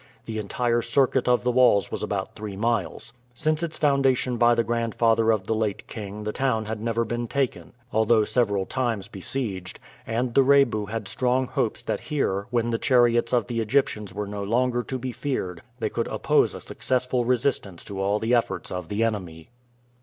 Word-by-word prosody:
The 110 -1 -4
entire 120 +3 0
circuit 130 +1 +2
of 125 -1 +3
the 125 - +2
walls 120 -5 +4
was - - -4
about - - -3
three 105 -2 -7
miles. 115 0 -2 0.2
Since 155 +4 0
its 165 -2 -3
foundation 135 -4 +2
by 120 0 +5
the 115 - +2
grandfather 115 0 +1
of 110 -4 +2
the 110 - 0
late 110 -3 -2
king 105 -1 -7
the 105 - -2
town 115 -3 0
had 110 0 -4
never 115 0 0
been 120 +1 -3
taken, 135 +1 -2 0.2
although 110 0 +4
several 100 -6 +1
times 120 -6 -2
besieged, 95 -2 -4 0.3
and 120 +2 -1
the 135 - +6
Rebu 130 -6 +3
had 110 -1 -4
strong 130 +1 +1
hopes - - -2
that - - -2
here, 100 -9 -1
when 120 -1 0
the 115 - 0
chariots 120 -3 +3
of 120 -4 +2
the 115 +1 -3
Egyptians 110 -3 0
were 105 +1 -4
no 100 0 -5
longer 120 +3 +1
to 130 +2 -4
be 130 0 -4
feared, 115 - -3 0.2
they 110 -3 -1
could 115 - -1
oppose - - +2
a - - -8
successful 125 -1 -1
resistance 120 -7 -1
to 100 -1 -5
all 100 +2 +1
the 110 +3 0
efforts 120 -1 0
of 90 -2 -4
the 105 +2 0
enemy. 90 -8 -3
115 Hz, 190 wpm, -25 LUFS, 105-125 Hz, 0.3 s, the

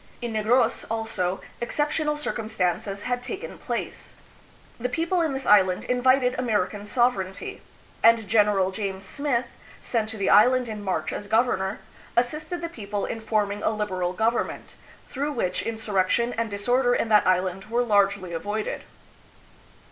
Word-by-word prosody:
In 240 -2 -4
Negros, 220 +4 +2
also, 220 -5 -2 0.2
exceptional 300 +4 0
circumstances 205 - -2
had 245 0 -1
taken 375 +11 -6
place. - - -5 0.6
The 250 +2 -1
people 335 +5 0
in 320 -3 +1
this 265 0 -3
island 190 -3 +4
invited 250 0 +3
American 210 -4 -1
sovereignty; 205 -6 0 0.4
and 230 -2 +5
Gen. 205 -2 +3
James 195 -1 -4
Smith, 280 -3 -1 0.3
sent 220 -3 -1
to 220 - -7
the 195 - -1
island 250 +4 +5
in 215 -2 -6
March 180 -5 -2
as 205 - -5
governor, 220 -4 +1 0.4
assisted 310 +8 0
the 335 - -2
people 205 -9 -4
hi 225 - -4
forming 210 -2 -1
a - - +2
liberal 185 -5 -2
government, 225 +5 -1 0.3
through 290 +3 -3
which 185 -8 -1
insurrection 220 +1 0
and 230 0 -2
disorder 245 +5 +2
in 225 - 0
that 210 -3 +5
island 185 +1 +1
were 235 +3 0
largely 200 -5 +2
avoided. 205 +6 -3
220 Hz, 140 wpm, -25 LUFS, 200-245 Hz, 0.6 s, and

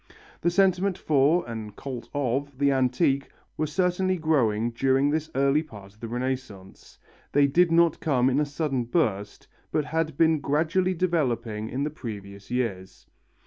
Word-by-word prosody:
The 175 - +2
sentiment 190 +1 +2
for, 150 +3 +2
and 110 -3 -7
cult 130 -4 -7
of, 140 0 -2
the 140 0 +3
antique 135 +2 +1 0.3
were 155 - -1
certainly 185 +3 0
growing 120 -9 +1
during 135 +3 +2
this 155 +1 -1
early 140 +2 +3
part 105 -10 -12
of 105 - -27
the 115 - -6
Renaissance; 120 -5 -5 0.3
they 145 0 +4
did 165 +5 +3
not 170 -1 +4
come 130 -5 +2
in 135 +2 +2
a - - +3
sudden 145 -4 -2
burst, 105 - -1 0.2
but 150 - 0
had 160 -2 -2
been 160 -1 +4
gradually 165 +6 +1
developing 120 -11 -1
in 135 +3 -2
the 150 - -2
previous 100 -7 -8
years. 110 -7 -3
140 Hz, 155 wpm, -26 LUFS, 120-160 Hz, 0.3 s, they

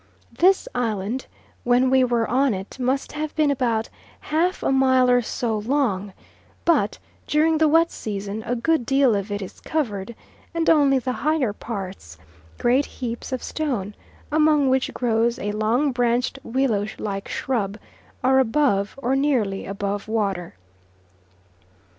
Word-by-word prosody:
This 375 +2 +3
island, 230 0 -2 0.4
when 250 +2 +3
we 260 -1 +5
were 240 -2 +1
on 255 0 +2
it, 190 +7 -8
must 260 +2 -1
have 305 0 -4
been 305 -2 +3
about 235 -4 0 0.3
half 340 +5 0
a - - +1
mile 260 -1 +4
or 245 0 +4
so 225 -1 -2
long, 210 -5 -1 0.5
but 280 -12 +2 0.3
during 315 +1 +2
the 315 - +5
long 300 - +1
wet 330 +1 +4
season 205 0 -5
a 245 - 0
good 310 +4 +1
deal 270 -2 +3
of 200 +1 -3
it 205 0 -2
is 185 - -10
covered, 235 -9 -3 0.4
and 330 0 +3
only 285 -4 +4
the 255 0 -2
higher 280 -4 0
parts 190 - -7 0.4
great 255 +4 +2
heaps 235 0 -6
of 255 - -3
stone, 240 -11 -3 0.4
among 300 -3 +3
which 265 0 +1
grows 235 0 +1
a 205 - -3
long 225 +7 +1
branched 245 +1 0
willow 230 -5 0
like 195 -1 -4
shrub 210 -6 -2 0.5
are 265 +1 +4
above 245 -5 +1
or 255 +2 +2
nearly 250 -9 0
above 200 +1 -3
water. 195 - -2
245 Hz, 145 wpm, -23 LUFS, 210-275 Hz, 0.5 s, we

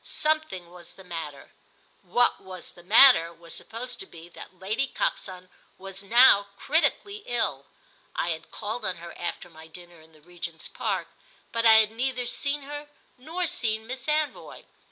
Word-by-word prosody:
Something 305 - -1
was 175 -1 -13
the 190 - -13
matter; 165 -5 -7 0.5
what 245 -4 +2
was 185 -2 -8
the 175 - -16
matter 205 -3 +7
was 170 0 -10
supposed 245 +3 -5
to 195 - -8
be 170 +1 -13
that 185 - -12
Lady 215 +9 -1
Coxon 185 -7 -3 0.3
was 195 0 -8
now 205 -1 +6
critically 400 - 0
ill. 210 - -1 0.5
I 170 - 0
had 160 -1 -4
called 220 +2 -5
on 185 -3 -1
her 170 0 -10
after 175 0 -5
my 160 -1 -14
dinner 175 0 -13
in 160 +1 -19
the 155 - -20
Regent's 170 -1 -5
Park, - - -2 0.4
but 230 0 +2
I 225 - +9
had 220 -1 +5
neither 250 +2 -1
seen 285 +3 -1
her 290 +1 -7 0.3
nor 330 +7 -2
seen 220 -7 -1
Miss 260 +3 -6
Anvoy. 305 -1 -1
200 Hz, 165 wpm, -27 LUFS, 175-255 Hz, 0.5 s, I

